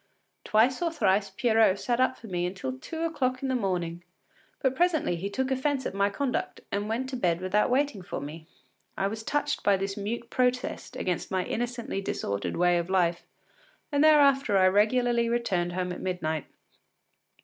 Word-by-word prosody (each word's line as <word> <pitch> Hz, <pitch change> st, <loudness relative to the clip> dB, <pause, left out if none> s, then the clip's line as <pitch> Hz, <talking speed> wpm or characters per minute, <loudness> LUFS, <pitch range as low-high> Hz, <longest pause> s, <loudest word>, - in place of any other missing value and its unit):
Twice 240 Hz, +6 st, +3 dB
or 340 Hz, -1 st, +1 dB
thrice 200 Hz, -8 st, +1 dB
Pierrot 220 Hz, -1 st, +3 dB
sat 240 Hz, -1 st, -1 dB
up 255 Hz, 0 st, +2 dB
for -, -, -13 dB
me 180 Hz, -4 st, -1 dB
until 180 Hz, -8 st, -4 dB
two 325 Hz, -, -5 dB
o’clock 270 Hz, -6 st, -1 dB
in 270 Hz, -, -1 dB
the 260 Hz, -, +1 dB
morning, 175 Hz, -6 st, -2 dB, 0.6 s
but 265 Hz, -1 st, +1 dB
presently 330 Hz, -, +2 dB
he 190 Hz, +4 st, -4 dB
took 265 Hz, +5 st, -2 dB
offence 265 Hz, 0 st, 0 dB
at -, -, -3 dB
my 200 Hz, +1 st, +2 dB
conduct 250 Hz, +5 st, -2 dB
and 205 Hz, +1 st, -2 dB
went 240 Hz, +4 st, -1 dB
to 265 Hz, -, -4 dB
bed 175 Hz, -8 st, +1 dB
without 185 Hz, +3 st, +1 dB
waiting 260 Hz, -5 st, +1 dB
for 180 Hz, -, -5 dB
me. 155 Hz, +3 st, -8 dB, 0.5 s
I 195 Hz, -, 0 dB
was 220 Hz, +2 st, -3 dB
touched 290 Hz, +5 st, -1 dB
by 200 Hz, -1 st, +4 dB
this 195 Hz, +1 st, -3 dB
mute 230 Hz, +3 st, -4 dB
protest 250 Hz, 0 st, -1 dB
against 180 Hz, -2 st, -2 dB
my 185 Hz, -1 st, -1 dB
innocently 240 Hz, -4 st, -3 dB
disorderly 100 Hz, -, -3 dB
way 175 Hz, 0 st, +3 dB
of 170 Hz, +1 st, -4 dB
life, 175 Hz, -2 st, +1 dB, 0.6 s
and 285 Hz, 0 st, +3 dB
thereafter 275 Hz, -7 st, +5 dB
I 185 Hz, 0 st, +6 dB
regularly 235 Hz, +4 st, +2 dB
returned 190 Hz, -7 st, 0 dB
home 180 Hz, 0 st, -2 dB
at 180 Hz, -, -6 dB
midnight. 160 Hz, -5 st, -2 dB
215 Hz, 180 wpm, -28 LUFS, 185-255 Hz, 0.6 s, I